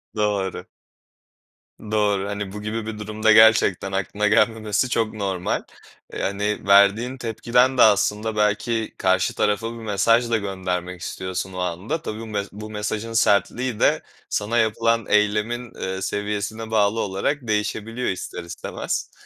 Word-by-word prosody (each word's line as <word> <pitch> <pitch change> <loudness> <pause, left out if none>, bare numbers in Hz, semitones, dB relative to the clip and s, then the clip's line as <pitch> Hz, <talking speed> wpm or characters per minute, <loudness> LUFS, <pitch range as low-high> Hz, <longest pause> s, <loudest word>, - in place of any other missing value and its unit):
Doğru. 105 -3 -1 1.2
Doğru, 105 -2 0
hani, 100 -1 -4
bu 105 - -6
gibi 110 +1 -4
bir 110 -1 -6
durumda 110 +1 +1
gerçekten 110 -3 +5
aklına 100 +2 -1
gelmemesi 110 +2 +2
çok 115 -3 0
normal. 95 -4 -2 0.5
Eee, - - -4
hani, 105 +1 -2
verdiğin 100 +6 +4
tepkiden 125 +2 +1
de - - +5
aslında 105 +1 +3
belki 105 +2 0
karşı 95 0 +1
tarafa 105 +2 0
bir - - -9
mesaj 115 +2 +2
da 115 - +2
göndermek 90 -3 -4
istiyorsun 95 +1 -4
o - - -7
anda. 90 - -3
Tabii 110 -8 -5
bum 110 -1 -8 0.2
bu 105 +1 -8
mesajın 105 +1 -4
sertliği 110 +3 +1
de - - +3 0.3
sana 110 +3 -1
yapılan 115 0 +2
eylemin, 105 +3 +1
eee, 95 0 -3
seviyesine 105 +3 -3
bağlı 110 0 +2
olarak 100 +9 -1
değişebiliyor 110 +3 -2
ister 90 -1 -5
istemez 85 0 -4
105 Hz, 135 wpm, -23 LUFS, 100-115 Hz, 1.2 s, gerçekten